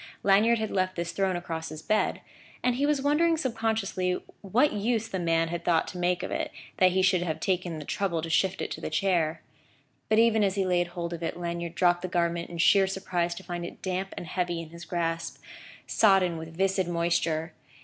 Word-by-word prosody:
Lanyard 210 +4 +5
had 220 -1 -3
left 185 -1 0
this 170 0 -3
thrown 190 -2 0
across 165 -2 -4
his 155 0 -8
bed; 215 +4 +1 0.4
and 250 - +3
he 275 +4 +1
was 295 -2 +1
wondering 320 +3 +3
subconsciously 220 - -1 0.3
what 235 +9 +2
use 225 +2 0
the 190 -4 -3
man 165 -1 +1
had 170 0 -4
thought 170 -2 +2
to 180 - -7
make 180 0 +1
of - - -4
it, - - -2 0.3
that 185 -4 +5
he 190 0 +2
should 185 -1 +3
have 165 -3 -2
taken 180 -3 -1
the 150 - -7
trouble 170 -4 -1
to 165 - -4
shift 190 +3 +1
it - - -5
to - - -5
the - - -3
chair. 165 -1 0 0.7
But 215 - +3
even 225 -1 +4
as 195 -1 +1
he 195 -1 +1
laid 175 -1 +2
hold 175 -1 -5
of 170 - -6
it, 165 - -3
Lanyard 170 -1 -4
dropped 175 -1 +3
the 185 - -3
garment 170 -1 -1
in 170 - -7
sheer 195 +4 +5
surprise 180 -3 -2
to 190 - -9
find 175 -2 -5
it 170 - -9
damp 190 +1 -3
and - - -5
heavy 175 0 -2
in 165 -1 -8
his 170 0 -10
grasp, 165 -1 -2 0.5
sodden 190 -6 +3
with 160 0 -9
viscid 190 -1 +1
moisture. 170 -1 0
180 Hz, 215 wpm, -28 LUFS, 170-195 Hz, 0.7 s, Lanyard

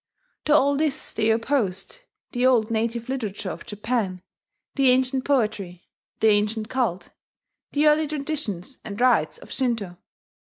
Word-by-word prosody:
To 300 - +3
all 280 -1 +4
this 300 -2 -1
they 220 0 +1
opposed 225 - 0 0.3
the 245 -1 -1
old 240 -3 +4
native 230 +1 -1
literature 215 -7 -3
of - - -9
Japan, 210 -4 -2 0.5
the 275 -2 +4
ancient 260 +1 +2
poetry, 210 -9 -1 0.4
the 220 - +6
ancient 215 +1 +1
cult, 235 -9 -1 0.6
the 295 +1 +3
early 305 +1 +4
traditions 280 - -4
and 200 -1 -7
rites 240 -11 +3
of - - -14
Shinto. 225 -9 -2
235 Hz, 135 wpm, -24 LUFS, 210-270 Hz, 0.6 s, the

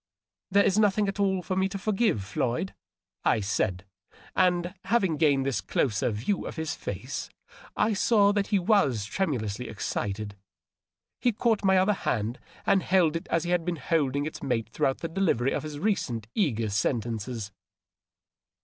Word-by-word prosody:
" - - -66
There 200 +1 +5
is 195 +2 +3
nothing 210 -1 +3
at 195 +1 -3
all 190 -2 +1
for 185 - -2
me 190 +1 +1
to 195 - -4
foi^ive, 210 - +1
Floyd," 120 - -2 0.5
I 110 - +3
said; 95 -2 -1 0.5
and 180 -1 +2
having 195 -7 +2
gained 145 -4 +3
this 135 -2 0
closer 110 -5 0
view 120 - -2
of - - -6
his 160 -2 -2
face 100 +7 -5 0.5
I 215 +1 +2
saw 205 0 +4
that 205 -1 0
he 205 - +2
was 175 - +2
tremu 150 - -1
lously 110 +3 -4
excited. 105 -1 -3 0.8
He 245 - +2
caught 220 0 +1
my 190 -1 +4
other 190 +3 +4
hand 120 - -2 0.3
and 195 - +4
held 180 -4 +3
it 165 - -4
as 165 - +1
he 175 - -2
had 175 -1 +2
been 175 0 -1
holding 145 -2 0
its 155 - -6
mate 115 -6 -1
throughout 135 +4 0
the 165 - -2
delivery 160 -8 +1
of - - -1
his 150 -1 -6
recent 145 - -1
eager 115 - 0
sentences. 110 0 -2
160 Hz, 170 wpm, -27 LUFS, 115-195 Hz, 0.8 s, There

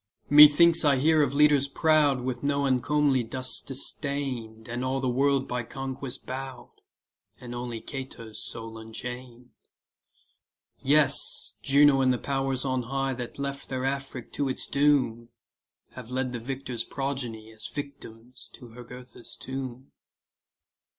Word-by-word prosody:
Methinks 150 +3 +8
I 145 -2 +4
hear 155 +4 +3
of 140 -1 0
leaders 145 -2 +4
proud 145 -3 +2
With 125 0 -4
no 140 0 0
uncomely 135 +1 +2
dust 130 +1 +1
distain'd, 130 -5 -2
And 120 +2 -4
all 130 +1 -1
the 130 - -2
world 135 +2 +1
by 125 0 -2
conquest 135 +2 -6
bow'd, 130 0 -8 0.6
And 120 -1 -9
only 120 -2 -5
Cato's 130 -5 -7
soul 115 0 -6
unchain'd. 125 +2 -9 1.3
Yes, 140 0 +3
Juno 140 -1 +5
and 130 -1 +3
the 125 - +1
powers 135 0 -2
on 130 -1 0
high 135 +2 -2
That 120 -1 -7
left 140 0 -5
their 130 -1 -3
Afric 135 -2 -4
to 140 -2 -1
its 130 - -2
doom, 135 -5 +1 0.6
Have 125 -2 -10
led 130 0 -2
the 120 - -4
victors' 125 -1 -4
progeny 125 -6 -4
As 110 -1 -8
victims 125 -4 -9
to 120 -2 -13
Jugurtha's 125 0 -10
tomb. 130 0 -7
130 Hz, 135 wpm, -27 LUFS, 120-140 Hz, 1.3 s, Methinks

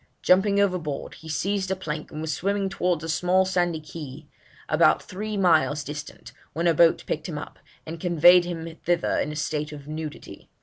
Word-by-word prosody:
Jumping 200 +2 +4
overboard, 180 -8 -1
he 160 - -12
seized 190 +4 -1
a 190 - 0
plank, 155 -5 -5
and 155 - -6
was 160 -1 -2
swimming 200 +3 -1
towards 175 -4 -1
a - - -4
small 180 +4 +2
sandy 175 -3 0
quay 155 - -15 0.3
(key) 150 - -27 0.4
about - - +3
three 210 +3 -5
miles 160 -5 +3
distant, 150 +1 -8 0.2
when 170 +2 -2
a 170 - +4
boat 165 +1 +4
picked 155 +3 -3
him 155 - -4
up, - - -8 0.3
and 165 +1 -7
conveyed 175 +1 +6
him 165 -2 -6
thither 175 0 +1
in 150 - -1
a - - -6
state 150 0 -2
of 145 -1 -10
nudity. 155 0 -8
170 Hz, 190 wpm, -25 LUFS, 155-185 Hz, 0.4 s, conveyed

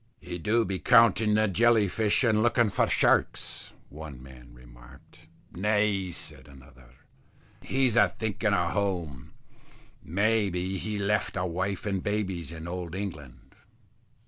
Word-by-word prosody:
"He 90 +1 -7
do 110 +6 +1
be 95 -2 -3
counting 110 +2 +4
the 110 0 +3
jelly 110 +1 +3
fish 110 +5 +1
and 110 -3 +3
looking 120 -1 +3
for - - +1
sharks," - - +1 0.2
one 75 -3 -9
man 65 -2 -14
remarked. - - -17 0.3
"Nay," 105 0 0
said 75 -5 -9
another, 65 -3 -17 0.7
"he's 130 -3 0
a 120 - +5
thinking 110 -1 -2
o' 85 -1 0
home. 85 -9 -3 0.7
May 100 +5 +1
be, 90 +1 -3
he 110 - -4
has 100 -1 -2
left 100 -1 0
a 90 - -1
wife 95 +3 -3
and 95 -3 -1
babies 95 -6 -3
in 80 0 -8
old 90 -1 -5
England." 80 -10 -8
95 Hz, 145 wpm, -27 LUFS, 80-105 Hz, 0.7 s, a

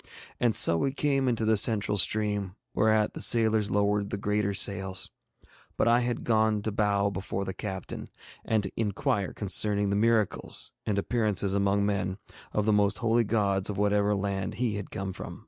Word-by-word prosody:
And 120 -3 +1
so 85 - +5
we 135 - 0
came 140 -2 0
into 115 -3 0
the 110 0 +3
central 105 0 +2
stream, 105 -1 0 0.2
whereat 110 0 +2
the - - -6
sailors 110 -3 +3
lowered 105 0 0
the - - -3
greater 105 0 -1
sails. 95 -1 0 0.7
But - - +1
I 120 +1 +4
had 120 -1 -2
gone 110 -2 +1
to 110 - -2
bow 100 -1 +1
before 100 +1 -4
the 95 - -4
captain, 95 -2 -6 0.3
and 110 -2 0
to 95 - -5
inquire 100 -2 -1
concerning 100 0 +2
the - - 0
miracles, 110 -1 0 0.2
and 105 -2 0
appearances 105 -2 0
among 100 0 +1
men, 95 -2 -2 0.3
of 105 - -1
the 110 - +2
most 100 0 +2
holy 115 0 +1
gods 100 -3 0
of 100 - -4
whatever 105 0 +1
land 100 +1 -3
he 120 -3 -1
had 100 -2 -6
come 95 0 -5
from. - - -8
105 Hz, 180 wpm, -27 LUFS, 100-110 Hz, 0.7 s, so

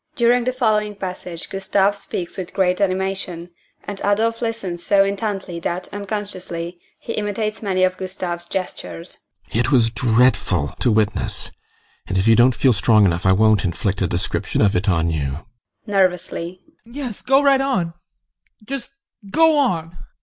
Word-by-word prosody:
[During 240 0 +3
the 255 - +1
following 215 -4 +1
passage 180 -3 -6
GUSTAV 195 +1 +1
speaks 180 -3 -5
with 185 -2 -7
great 185 0 +2
animation, 190 -2 -2 0.3
and 205 -1 -6
ADOLPH 225 +3 +1
listens 200 -7 -3
so 200 -1 +4
intently 195 -3 -3
that, 175 +2 -3
unconsciously, 190 -4 -5 0.2
he 230 - -5
imitates 215 +1 -2
many 190 -3 +1
of 185 0 +2
GUSTAV'S 180 -2 -4
gestures.] 90 - -6 0.2
GUSTAV. 115 - 0
It 120 +3 +1
was 115 -4 +4
dreadful 110 - +2
to 125 - +2
witness, 105 -1 -1 0.6
and 95 - -1
if 95 +3 +1
you 115 - +7
don't 120 +1 +5
feel 125 +3 +4
strong 110 0 +4
enough 90 0 +1
I - - +6
won't 110 0 +4
inflict 95 +2 -1
a 95 - +2
description 85 +2 -1
of 100 -1 +3
it 95 +3 +1
on 85 -2 +2
you. 70 -1 -3 0.4
ADOLPH. 185 -3 0 0.3
Yes, 245 -3 -6
go 270 +2 +3
right 275 -1 +5
on 185 -12 0 0.7
just 270 +1 -5 0.4
go 320 +7 +4
on! 175 - 0
185 Hz, 155 wpm, -21 LUFS, -, 0.7 s, you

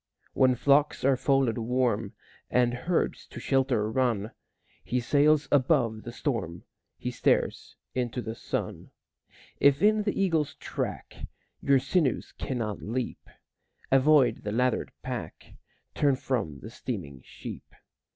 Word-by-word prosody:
When 130 -1 +4
flocks 145 +3 +3
are 135 -1 +5
folded 130 -3 +1
warm, 115 -3 0 0.4
And 120 -1 +2
herds 170 +8 -1
to - - -9
shelter 130 -5 +1
run, 115 -4 0 0.5
He 125 - -1
sails 145 +3 +3
above 125 -6 +2
the 120 - -7
storm, 115 - -3 0.3
He - - -4
stares - - 0 0.2
into 125 -1 -2
the 110 - -4
sun. - - -4 0.7
If 140 +4 +4
in 215 +1 +5
the 205 -1 -1
eagle's 165 -7 +1
track - - -5 0.3
Your 140 -1 +4
sinews 140 +2 0
cannot 115 -6 -3
leap, 120 +3 -4 0.6
Avoid 135 -3 +4
the 105 - -3
lathered 125 +2 0
pack, - - -6 0.4
Turn 140 -2 +2
from 110 - -3
the 110 - -9
steaming 90 - -6
sheep. - - -9
125 Hz, 125 wpm, -28 LUFS, 115-140 Hz, 0.7 s, are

